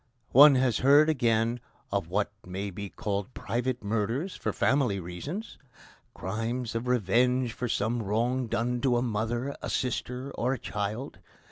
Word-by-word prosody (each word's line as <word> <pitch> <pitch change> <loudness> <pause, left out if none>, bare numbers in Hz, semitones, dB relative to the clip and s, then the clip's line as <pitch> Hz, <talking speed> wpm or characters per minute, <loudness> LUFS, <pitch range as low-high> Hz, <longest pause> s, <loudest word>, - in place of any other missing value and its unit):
One 140 +2 +9
has 130 -3 +2
heard, 145 +4 +6
again, 120 -4 +1 0.3
of - - -1
what 100 +4 0
may 95 +2 -5
be 100 +2 -6
called 100 +4 -4
private 125 0 -2
murders 115 - -1
for - - -2
family 130 -8 +1
reasons 115 - -6 0.6
crimes 115 +5 -3
of 115 +2 -3
revenge 125 +2 +2
for 125 -1 -3
some 115 +4 0
wrong 120 +5 0
done 120 +2 -1
to 125 -2 +3
a 120 - +1
mother, 120 +4 -2
a - - -4
sister, 125 +1 -2
or 125 +1 -1
a - - -2
child. 105 +5 -4
120 Hz, 150 wpm, -28 LUFS, 105-130 Hz, 0.6 s, One